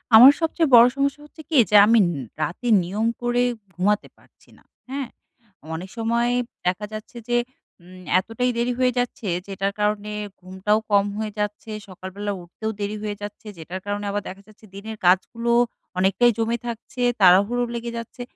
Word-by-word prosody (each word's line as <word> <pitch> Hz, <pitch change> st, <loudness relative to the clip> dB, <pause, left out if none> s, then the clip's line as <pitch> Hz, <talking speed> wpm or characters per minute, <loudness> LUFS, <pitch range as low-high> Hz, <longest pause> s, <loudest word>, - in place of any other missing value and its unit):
আমার 255 Hz, +5 st, +11 dB
সবচেয়ে 325 Hz, 0 st, +1 dB
বড়ো 235 Hz, +1 st, +9 dB
সমস্যা 280 Hz, +1 st, -1 dB
হচ্ছে 305 Hz, +1 st, -14 dB
কি? 315 Hz, -, +2 dB
যে 210 Hz, -, +2 dB
আমি 220 Hz, -2 st, +5 dB, 0.4 s
রাতে 170 Hz, +11 st, -3 dB, 0.2 s
নিয়ম 200 Hz, +6 st, -2 dB, 0.2 s
করে 240 Hz, 0 st, +1 dB, 0.3 s
ঘুমাতে 205 Hz, +4 st, 0 dB
পারছি -, -, -26 dB
না, -, -, -24 dB, 0.3 s
হ্যাঁ? 270 Hz, -2 st, -4 dB, 0.7 s
অনেক 180 Hz, +4 st, -7 dB
সময় 235 Hz, +1 st, +1 dB, 0.3 s
দেখা 185 Hz, +3 st, 0 dB
যাচ্ছে 215 Hz, +2 st, -8 dB
যে 240 Hz, -, +3 dB, 0.5 s
উম 185 Hz, +1 st, -14 dB, 0.2 s
এতটাই 235 Hz, +6 st, -1 dB
দেরি 240 Hz, +1 st, 0 dB
হয়ে 255 Hz, -1 st, +3 dB
যাচ্ছে, 245 Hz, -3 st, -3 dB, 0.2 s
যেটার 195 Hz, 0 st, -2 dB
কারণে 210 Hz, 0 st, 0 dB, 0.3 s
ঘুমটাও 190 Hz, +3 st, 0 dB
কম 200 Hz, -1 st, +4 dB
হয়ে 215 Hz, -1 st, -3 dB
যাচ্ছে, 210 Hz, +1 st, -3 dB, 0.2 s
সকালবেলা 190 Hz, +2 st, -6 dB
উঠতেও 200 Hz, +6 st, -5 dB
দেরি 205 Hz, +1 st, -2 dB
হয়ে 210 Hz, -1 st, -3 dB
যাচ্ছে। 205 Hz, +1 st, -8 dB
যেটার 175 Hz, +3 st, -7 dB
কারণে 205 Hz, 0 st, -3 dB
আবার 205 Hz, +1 st, -1 dB
দেখা 190 Hz, +1 st, -8 dB
যাচ্ছে 215 Hz, 0 st, -18 dB
দিনের 220 Hz, +2 st, -7 dB
কাজগুলো 230 Hz, +6 st, +2 dB, 0.5 s
অনেকটাই 195 Hz, +6 st, +4 dB
জমে 230 Hz, +1 st, 0 dB
থাকছে, 235 Hz, +2 st, -6 dB, 0.2 s
তাড়াহুড়ো 200 Hz, +7 st, +5 dB
লেগে 235 Hz, 0 st, -4 dB
যাচ্ছে। 230 Hz, +2 st, -8 dB
215 Hz, 160 wpm, -23 LUFS, 195-235 Hz, 0.7 s, আমার